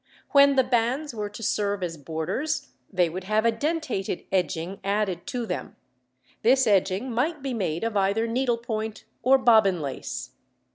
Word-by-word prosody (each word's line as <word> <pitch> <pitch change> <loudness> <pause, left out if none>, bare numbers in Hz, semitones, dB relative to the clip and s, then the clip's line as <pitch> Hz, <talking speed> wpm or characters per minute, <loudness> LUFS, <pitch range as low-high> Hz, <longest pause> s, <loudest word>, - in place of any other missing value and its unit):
When 280 -1 +6
the 260 - +5
bands 250 +4 0
were 210 -2 -3
to 210 +2 -9
serve 205 -2 0
as 170 -2 -3
borders 160 - -3 0.2
they 180 -3 +3
would 185 +3 -6
have 215 +3 +1
a 230 - +5
dentated 285 - -2
edging 180 0 -1
added 200 -3 -1
to 245 -2 -2
them; - - -5 0.7
this 260 +3 +4
edging 200 +4 +2
might 280 +6 -1
be 270 -2 -2
made 180 -7 -2
of 225 -1 -2
either 200 +3 +2
needlepoint 230 -3 -2 0.2
or 265 +2 +5
bobbin 220 -8 +4
lace. 140 -3 -5
220 Hz, 155 wpm, -26 LUFS, 190-255 Hz, 0.7 s, When